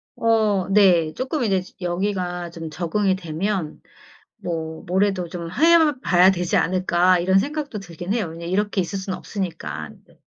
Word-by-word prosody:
어 215 -4 +2
네. 180 -6 +4
쪼끔 260 - -2
이제 195 -5 +1 0.2
여기가 180 -1 -2
좀 165 -1 -7
적응이 185 +5 0
되면 180 -1 -3 0.6
뭐 160 -2 -5
'뭐래도 190 -1 0
좀 170 -1 -6
해 315 - +4
봐야 180 -5 +5
되지 180 -2 -1
않을까?' 185 0 +3
이런 190 +2 +3
생각도 285 0 -3
들긴 175 0 -6
해요, 225 -5 0
왜냐면 165 +1 -7
이렇게 205 0 0
있을 190 +2 -3
순 190 0 -4
없으니깐. 165 - -6
네. - - -25
185 Hz, 295 characters per minute, -22 LUFS, 170-205 Hz, 0.6 s, 봐야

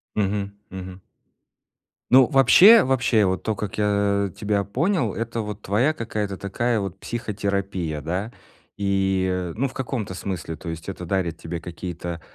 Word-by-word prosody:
Мгм, 100 -1 -1 0.2
мгм. 95 0 -8 1.1
Ну, 130 0 +8
вообще, 175 - +8
вообще, 125 -5 +2
вот 95 -2 -1
то, 110 - 0
как 100 -1 -5
я 100 -1 +1
тебя 105 -1 0
понял- 130 - 0
это 115 +1 -3
вот 105 -1 -6
твоя 120 +10 +2
какая-то 105 -6 -3
такая 115 +4 -1
вот 95 -2 -4
психотерапия, 100 -8 -3
да? 90 +8 -3 0.5
И, 95 -2 0
ну, 135 +5 0
в 130 - -11
каком-то 125 -7 -3
смысле. 90 -3 -4
То 85 - -8
есть 80 +2 -7
это 90 -2 -6
дарит 85 -3 -1
тебе 85 +1 -5
какие-то 85 0 -6
100 Hz, 145 wpm, -23 LUFS, 95-115 Hz, 1.1 s, Ну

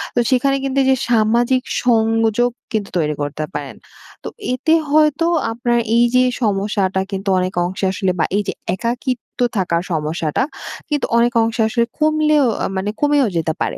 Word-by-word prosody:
তো 245 - +3
সেখানে 275 +2 +2
কিন্তু 275 0 0
যে 265 - +5 0.2
সামাজিক 235 +3 +2 0.2
সংযোগ 225 0 +2 0.2
কিন্তু 205 -2 -1
তৈরি 150 -1 0
করতে 145 +1 -3
পারেন। - - -5 0.5
তো - - -4 0.2
এতে 315 +5 +1 0.2
হয়তো 305 +2 +3 0.3
আপনার 240 0 0 0.2
এই 240 - +5
যে 255 - +5 0.2
সমস্যাটা 195 -2 0
কিন্তু, 195 0 -3
অনেক 185 0 -2
অংশে 190 +2 -3
আসলে 190 -1 0
বা - - +3
এই 210 - 0
যে - - -1 0.2
একাকিত্ব 240 +4 -3 0.3
থাকার 175 -2 0
সমস্যাটা, 155 - -1 0.5
কিন্তু 295 -2 0
অনেক 240 +2 +2
অংশে 225 +1 -1
আসলে 235 +1 +1
কমলেও 305 -2 +3 0.2
আ - - +1
মানে 200 +2 -2
কমেও 290 -3 +3
যেতে 160 -1 0
পারে। - - -1
230 Hz, 160 wpm, -18 LUFS, 190-260 Hz, 0.5 s, যে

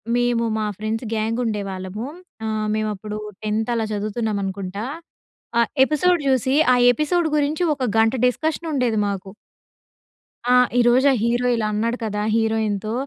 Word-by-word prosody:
మేము 245 -1 +1 0.2
మా 215 - -1
friends 220 +3 -3
gang 225 +2 -1
ఉండేవాళ్ళము. 200 0 -4 0.4
ఆహ్, 215 -1 -1
మేము 215 0 -1
అప్పుడు 210 +2 -6 0.3
10థ్ 215 +2 -1
అలా 225 -1 0
చదువుతున్నాం 215 +1 -2
అనుకుంటా. 195 +2 -4 0.7
ఆ - - +6 0.2
ఎపిసోడ్ 340 +4 +2
చూసి 260 0 +2 0.2
ఆ - - +5 0.2
ఎపిసోడ్ 310 +6 0
గురించి 300 +3 0
ఒక 265 -2 -3
గంట 225 0 +4
డిస్కషన్ 315 +6 -1
ఉండేది 250 -6 +1
మాకు. 195 -1 -5 1.2
ఆ! 250 - +4 0.3
ఈరోజు 245 +3 +4
ఆ - - +3
హీరో 240 +1 +1
ఇలా 220 -2 -1
అన్నాడు 230 +3 0
కదా 210 -1 -2
హీరోయిన్‌తో 220 -2 0
225 Hz, 140 wpm, -22 LUFS, 210-250 Hz, 1.2 s, ఆ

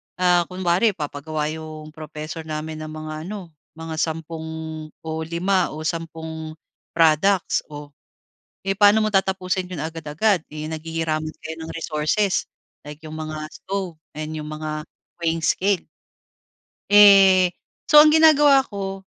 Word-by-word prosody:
ah, 180 -2 +3
kunwari, 185 +3 +1
magpapagawa 150 0 -3
yung 155 -1 -8
professor 155 +1 -8
namin 155 0 -5
ng 155 - -6
mga 155 0 -6
ano, 195 -4 -7 0.2
mga 160 -1 -6
10 160 0 -3 0.6
o 160 - -6 0.2
5 180 +1 0
o 155 - -6
10 160 -1 -5 0.4
products, 165 +4 +3
oh, 145 -1 -10 0.8
eh, 195 - +1
pa'no 205 +1 +6
mo - - +1
tatapusin 190 -1 0
‘yon 175 - -5
agad-agad, 160 +4 0
eh, 155 0 -5
naghihiraman 160 0 -3
kayo 160 0 -6
ng 160 - -7
resources, 165 +5 0 0.4
like 150 0 -10
yung 155 0 -8
mga 155 -1 -5
stove 190 -3 -4 0.2
and 155 0 -5
yung 150 -1 -6
mga 155 0 -4 0.4
weighing 165 0 +1
scale. 190 +3 +2 1.1
Eh, 195 -3 +7 0.4
so, 300 0 +10
ang 305 - +7
ginagawa 295 -4 +6
ko, 195 -2 -5
165 Hz, 130 wpm, -22 LUFS, 155-190 Hz, 1.1 s, so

